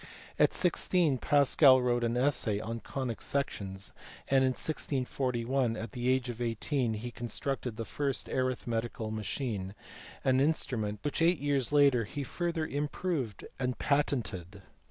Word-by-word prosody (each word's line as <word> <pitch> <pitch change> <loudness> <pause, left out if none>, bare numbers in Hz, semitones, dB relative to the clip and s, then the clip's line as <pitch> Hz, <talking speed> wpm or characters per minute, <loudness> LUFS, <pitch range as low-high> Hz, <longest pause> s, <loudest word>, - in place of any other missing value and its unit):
At - - +5
sixteen 175 -5 +2
Pascal 140 -1 +6
wrote 120 -1 +1
an 115 +1 0
essay 125 -6 +1
on 115 +2 -4
conic 125 -2 -4
sections; 100 -9 -3 0.4
and 135 -1 +4
in 130 -1 +3
1641, 130 -4 -1
at 110 -1 -5
the 125 +2 -1
age 130 -1 +2
of 120 -1 -5
eighteen, 120 +1 0
he 120 +3 -5
constructed 120 0 -4
the 115 - -3
first 140 +1 -2
arithmetical 120 -3 -2
machine, 105 -3 -3 0.5
an 130 0 +3
instrument 115 -8 0
which 145 +2 -1
eight 170 +1 +4
years 140 -3 0
later 140 -5 +5
he 140 +7 -5
further 170 +3 -2
improved 145 - -2
and 125 -1 -1
patented. 105 - -1
125 Hz, 135 wpm, -31 LUFS, 115-140 Hz, 0.5 s, Pascal